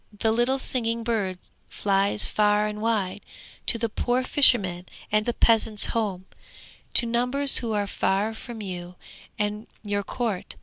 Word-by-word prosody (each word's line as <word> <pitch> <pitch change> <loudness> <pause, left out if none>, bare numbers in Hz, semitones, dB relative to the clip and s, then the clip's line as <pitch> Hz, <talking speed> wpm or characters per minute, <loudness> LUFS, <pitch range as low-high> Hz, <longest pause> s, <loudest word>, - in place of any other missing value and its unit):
The 220 +2 +1
little 240 +4 +1
singing 230 -3 -2
bird 210 -6 -2 0.3
flies 200 0 0
far 210 0 +1
and 210 0 -5
wide, 205 -3 -1 0.5
to 235 - +9
the 230 0 -1
poor 245 +3 -1
fisherman, 195 -11 +4 0.2
and 215 +1 +1
the 240 - 0
peasant's 220 -2 +3
home, 200 -5 -2 0.7
to 235 - +7
numbers 250 +4 +2
who 230 -2 -4
are 205 -1 -1
far 200 +2 -1
from 220 0 -9
you 180 -2 -7 0.4
and 210 +1 -3 0.2
your 205 -1 -2
court. 210 -2 -4
215 Hz, 145 wpm, -24 LUFS, 200-235 Hz, 0.7 s, to